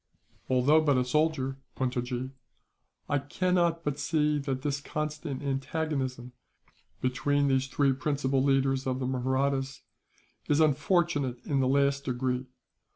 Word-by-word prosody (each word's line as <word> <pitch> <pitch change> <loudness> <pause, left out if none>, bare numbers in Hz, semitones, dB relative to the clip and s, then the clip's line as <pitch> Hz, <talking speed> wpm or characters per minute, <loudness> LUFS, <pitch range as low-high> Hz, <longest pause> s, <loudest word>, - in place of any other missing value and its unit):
"Although 130 +5 +4
but 145 -4 +3
a 125 - +2
soldier, 135 -1 0 0.2
Puntojee, 125 0 -2 0.8
I 145 - +1
cannot 170 +3 0
but 145 -1 -2
see 150 0 +1
that 135 -2 -3
this 145 -1 -1
constant 150 -2 -4
antagonism, 135 -3 -2 0.7
between 140 +3 +1
the 135 0 +4
three 135 +1 +1
principal 135 0 0
leaders 135 -1 +2
of 130 -1 0
the 130 - -3
Mahrattas, 130 +1 -1 0.7
is 145 - +3
unfortunate 150 -3 +2
in 140 -2 0
the 130 - +2
last 140 +1 +2
degree. 125 0 -1
135 Hz, 125 wpm, -29 LUFS, 130-150 Hz, 0.8 s, Although